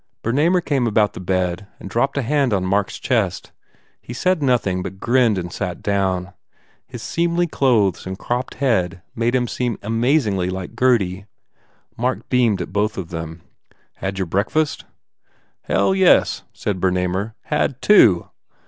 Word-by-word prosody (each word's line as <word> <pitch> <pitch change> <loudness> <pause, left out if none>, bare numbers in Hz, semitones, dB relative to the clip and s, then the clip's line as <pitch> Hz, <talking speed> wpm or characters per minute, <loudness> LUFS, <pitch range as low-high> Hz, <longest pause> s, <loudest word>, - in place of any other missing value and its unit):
Bernamer 155 +10 +2
came 135 -5 +1
about 105 -2 +2
the - - -8
bed 90 +1 -1
and - - -8
dropped 120 +8 0
a 140 - +1
hand 140 -1 +1
on 95 -1 -1
Mark 100 +1 +1
s - - -7
chest. - - -1 0.5
He 120 - -8
said 180 +6 +1
nothing, 115 -9 +1
but 95 +1 -7
grinned 120 -3 +2
and 85 -1 -5
sat 90 -3 -4
down. 95 -2 -1 0.5
His - - -9
seemly 170 +1 0
clothes 110 - +1
and 95 0 -5
cropped 120 +4 -3
head 95 -9 0
made 120 +2 0
him 125 -1 +1 0.4
amazingly 115 - +1
like 95 +3 -6
Gurdy. 105 -6 +1 0.7
Mark 125 +2 -2
beamed 120 -6 +2
at - - -11
both 105 +1 0
of 90 -4 -5
them. 80 -1 -7 0.5
"Had 95 0 -4
your 95 - -1
breakfast?" 110 - -1 0.8
"Hell, - - +2
yes," 190 -2 +3
said 95 -4 -4
Bernamer, 95 +3 0
"Had 150 -3 -1
two. 110 - +5
105 Hz, 150 wpm, -20 LUFS, 95-130 Hz, 0.8 s, two